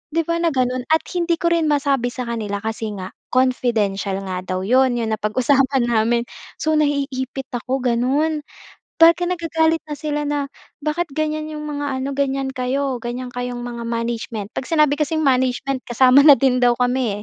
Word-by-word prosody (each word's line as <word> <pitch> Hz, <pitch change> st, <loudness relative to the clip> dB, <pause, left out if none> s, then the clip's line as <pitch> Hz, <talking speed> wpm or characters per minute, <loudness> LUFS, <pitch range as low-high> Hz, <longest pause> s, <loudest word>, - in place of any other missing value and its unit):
'Di 330 Hz, -, +3 dB
ba 335 Hz, +1 st, -1 dB
na 340 Hz, -, +1 dB
gano'n 255 Hz, -1 st, 0 dB
at 320 Hz, -, 0 dB
hindi 345 Hz, -1 st, 0 dB
ko 340 Hz, +1 st, 0 dB
rin 335 Hz, -1 st, +2 dB
masabi 280 Hz, -4 st, +1 dB
sa 255 Hz, -, -4 dB
kanila 210 Hz, -3 st, -3 dB
kasi 220 Hz, -1 st, -3 dB
nga 190 Hz, -1 st, -7 dB, 0.2 s
confidential 225 Hz, -6 st, +1 dB
nga 185 Hz, -1 st, -4 dB
daw 185 Hz, 0 st, -2 dB
'yon, 255 Hz, +4 st, +3 dB
'yong 230 Hz, -2 st, -2 dB
napag-usapan 250 Hz, +4 st, +1 dB
namin. 235 Hz, +1 st, +2 dB, 0.3 s
So 315 Hz, -, -1 dB
naiipit 275 Hz, -3 st, -2 dB
ako 255 Hz, +2 st, -3 dB
gano'n, 265 Hz, +6 st, +1 dB, 0.6 s
baka 335 Hz, +2 st, +6 dB
nagagalit 325 Hz, -2 st, 0 dB
na 295 Hz, -, -4 dB
sila 295 Hz, 0 st, -2 dB
na, 290 Hz, -1 st, -1 dB, 0.3 s
"Bakit 310 Hz, +3 st, -2 dB
ganyan 310 Hz, 0 st, -1 dB
'yong 300 Hz, -1 st, -6 dB
mga 290 Hz, -1 st, -4 dB
ano, 275 Hz, +1 st, -3 dB
ganyan 275 Hz, -1 st, -1 dB
kayo, 260 Hz, 0 st, -2 dB
ganyan 245 Hz, +1 st, -5 dB
kayong 245 Hz, 0 st, -4 dB
mga 240 Hz, -1 st, -6 dB
management." 230 Hz, -2 st, -4 dB
'Pag 255 Hz, -, -5 dB
sinabi 305 Hz, -3 st, +3 dB
kasing 310 Hz, +1 st, -1 dB
management 260 Hz, 0 st, +1 dB
kasama 255 Hz, +3 st, +6 dB
na 285 Hz, -1 st, +8 dB
din 255 Hz, 0 st, +2 dB
daw 240 Hz, -1 st, +4 dB
kami 245 Hz, -4 st, 0 dB
260 Hz, 170 wpm, -20 LUFS, 240-300 Hz, 0.6 s, na